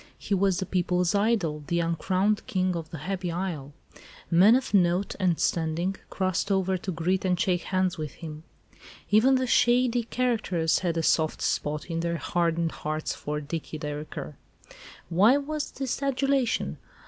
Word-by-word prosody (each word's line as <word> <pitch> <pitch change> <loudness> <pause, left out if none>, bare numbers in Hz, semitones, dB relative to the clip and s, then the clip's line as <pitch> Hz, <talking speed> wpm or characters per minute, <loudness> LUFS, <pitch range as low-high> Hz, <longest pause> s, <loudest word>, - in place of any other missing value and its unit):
He - - -3
was 195 -1 +2
the 190 - -2
people's 180 0 +1
idol, 200 -8 +1
the 170 - 0
uncrowned 185 +5 0
king 185 -1 0
of 165 -2 -5
the 165 - -7
happy 180 +3 -3
isle. 165 -6 -4 0.6
Men 190 +7 +7
of 260 -4 -1
note 180 0 +3
and 180 -4 +1
standing 170 +3 0
crossed 185 +1 -1
over 190 -1 +1
to 185 +1 -4
greet 180 +3 0
and 180 -2 +1
shake 180 -2 +1
hands 185 -2 0
with 155 -2 -4
him. 155 -2 -8 0.7
Even 235 +6 +5
the 260 0 +1
shady 245 0 +3
characters 225 -9 0
had 170 -2 -1
a 165 - 0
soft 155 0 +2
spot 150 0 -1
in 165 -1 -3
their 170 0 -1
hardened 170 +1 0
hearts 155 +1 -3
for 150 0 -4
"Dicky 155 +1 -5
Dereker." 150 0 -6 0.7
Why 205 +10 +5
was 300 +1 -3
this 270 -1 -4
adulation? 275 -2 0
180 Hz, 160 wpm, -27 LUFS, 165-205 Hz, 0.7 s, Men